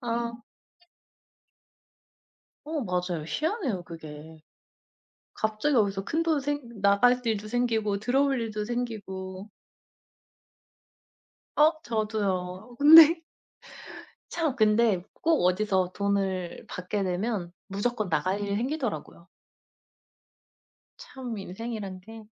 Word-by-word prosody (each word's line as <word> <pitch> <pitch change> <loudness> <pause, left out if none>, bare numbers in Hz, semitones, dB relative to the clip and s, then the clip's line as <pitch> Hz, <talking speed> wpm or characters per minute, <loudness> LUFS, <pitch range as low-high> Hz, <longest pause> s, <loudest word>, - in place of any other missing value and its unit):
아. 235 -1 -2 2.3
어 310 -1 -3
맞아요. 180 -4 -2
희한해요 305 - -2
그게. 160 -1 -10 0.9
갑자기 220 +7 0
어디서 200 -3 +2
큰돈 320 -1 +1
생 270 -7 -4
나갈 225 +6 +4
일도 215 -3 -1
생기고 220 -4 0
들어올 270 +3 +2
일도 215 -2 -3
생기고. 205 -5 -5 2.1
어 305 +2 +6
저도요. 210 -1 -2
근데 320 +3 +9 1.1
참 320 -6 -1
근데 215 -5 +3 0.2
꼭 320 - +3
어디서 185 -1 +1
돈을 195 -3 -1
받게 185 +3 -3
되면 185 -1 -2
무조건 210 +1 -2
나갈 185 +4 0
일이 200 -1 -2
생기더라고요. 240 - -3 1.7
참 265 - -7
인생이란 195 -1 -6
게 225 +3 -11
215 Hz, 195 characters per minute, -27 LUFS, 190-245 Hz, 2.3 s, 근데